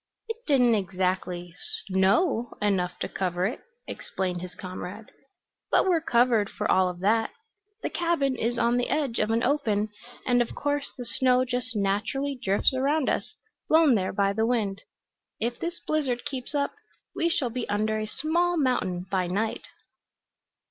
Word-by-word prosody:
"It 450 0 -4
didn't 250 -5 +5
exactly 185 -3 -1 0.3
snow 200 - +2
enough 190 -4 0
to - - 0
cover 180 -1 -1
it," 225 - -2 0.3
explained 180 -2 -4
his 180 0 -8
comrade. 185 +3 -7 0.6
"But - - +3
we're 345 -3 +3
covered 235 -6 +3
for 210 - -3
all 185 -1 +4
of 180 0 -8
that. 220 +3 +2 0.5
The - - -2
cabin 335 -6 +1
is 235 0 -1
on 235 +1 +2
the 245 - 0
edge 275 -4 0
of - - +1
an 230 +1 +1
open, 225 -7 +1 0.4
and 245 -1 +3
of 240 - -2
course 290 0 -1
the 245 - -6
snow 255 +1 +2
just 250 -1 -2
naturally 210 +8 0
drifts 200 +3 +2
around 275 +3 +1
us, - - -2 0.3
blown 315 -4 +6
there 190 -4 +1
by 200 0 +1
the 220 +2 +1
wind. 210 -5 0 0.6
If 235 +1 -2
this 340 +1 -4
blizzard 270 -6 -1
keeps 265 +1 -5
up 280 0 0 0.4
we 335 - +1
shall 255 -7 0
be 245 0 -4
under 215 +1 0
a 215 - -3
small 340 +8 +1
mountain 185 - 0
by 185 -2 +1
night." 210 +5 -2
230 Hz, 160 wpm, -27 LUFS, 195-270 Hz, 0.6 s, blown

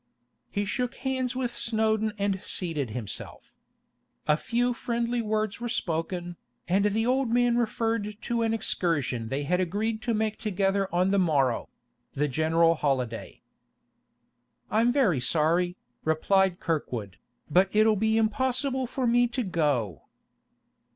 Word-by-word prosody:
He 205 0 -2
shook 245 +5 -2
hands 260 -2 -2
with 245 -2 -2
Snowdon 220 -1 0
and 200 -1 -1
seated 165 - -2
himself. 110 -1 -6 0.7
A 150 - +5
few 245 +8 0
friendly 235 0 -1
words 215 -1 -1
were 240 - -2
spoken, 175 -3 -2 0.3
and 195 +3 +2
the 215 +2 +1
old 255 0 +1
man 240 0 +3
referred 225 -2 -1
to 235 -1 -1
an 225 -1 +1
excursion 155 - -1
they 135 +5 -2
had 180 +5 +1
agreed 215 +5 -1
to 235 -1 0
make 215 0 -1
together 195 -2 0
on 180 +2 +2
the 200 - +3
morrow, 140 -9 +1 0.4
the 145 +2 0
general 160 +4 +3
holiday. 130 -7 -2 1.3
'I'm 230 +3 +3
very 230 - +3
sorry,' 170 +7 +1 0.3
replied 180 +4 +2
Kirkwood, 120 - -3 0.3
'but 185 +1 +4
it'll 215 +1 +4
be 220 +2 +2
impossible 260 +4 +1
for 255 +1 -2
me 240 +1 +4
to 245 +1 -2
go. 145 - -1
205 Hz, 135 wpm, -27 LUFS, 165-230 Hz, 1.3 s, A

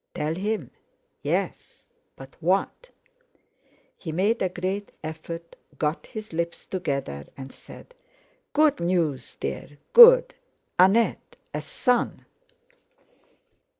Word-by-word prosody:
Tell 150 +1 -1
him?—yes. 195 - -5 0.2
But 135 0 -13
what? 190 - 0 1.1
He 165 - -7
made 195 +8 +1
a 185 - +1
great 185 +3 -4
effort, 165 +2 -7 0.2
got 150 +2 -2
his 215 -4 -8
lips 170 +1 -3
together, 140 - -3
and 135 -1 -8
said: - - -14 0.6
"Good 300 - +3
news, 170 -6 -1
dear, 70 - -5 0.2
good—Annette, 470 - +5 0.2
a - - -2
son." 250 -2 0
175 Hz, 90 wpm, -25 LUFS, 155-215 Hz, 1.1 s, good—Annette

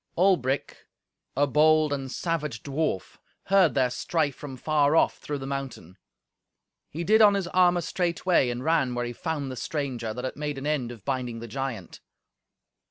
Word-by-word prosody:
Albric, 155 -8 +1 0.5
a 145 - +4
bold 155 +1 +4
and 135 -2 -4
savage 150 -10 -3
dwarf, 140 - -2 0.2
heard 195 -4 +3
their 130 -2 +2
strife 150 +1 -1
from 135 -3 -8
far 150 +1 +2
off - - +3
through 145 - -4
the 135 - -7
mountain. 135 -10 -6 0.9
He 165 +3 -5
did 220 +5 +4
on 205 -2 +7
his 195 -2 -1
armour 180 -1 +3
straightway, 175 -4 +1
and 120 +1 -4
ran 155 -6 +1
where 120 0 -1
he 120 - -5
found 145 -1 -3
the - - -6
stranger, 130 -4 -3
that 125 +4 -5
had 130 - -4
made 150 -1 -4
an 135 - -6
end 145 -6 -1
of 115 -5 -12
binding 125 -4 -2
the 115 - -7
giant. 120 -5 -5
140 Hz, 170 wpm, -26 LUFS, 125-160 Hz, 0.9 s, on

